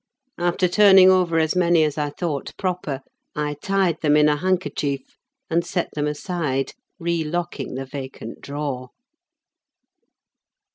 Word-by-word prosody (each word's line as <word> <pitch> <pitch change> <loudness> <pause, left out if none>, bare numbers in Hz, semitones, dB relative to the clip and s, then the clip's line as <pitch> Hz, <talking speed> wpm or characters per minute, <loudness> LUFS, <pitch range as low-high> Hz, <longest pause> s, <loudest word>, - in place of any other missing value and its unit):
After 175 +1 +2
turning 190 0 +7
over 180 -3 +2
as 160 0 +2
many 170 -2 +4
as 150 -2 0
I 150 -1 -1
thought 145 -2 -4
proper, 180 -8 -2 0.3
I 150 0 -1
tied 190 -4 +1
them 150 -1 +4
in 150 0 +5
a 150 - +3
handkerchief 150 -6 -1 0.4
and 170 +1 +1
set 175 0 -2
them 150 0 -1
aside, 150 -3 -2 0.3
relocking 170 -4 -2
the 135 +1 -4
vacant 130 -4 -8
drawer. 140 -3 -4
160 Hz, 130 wpm, -23 LUFS, 145-175 Hz, 0.4 s, turning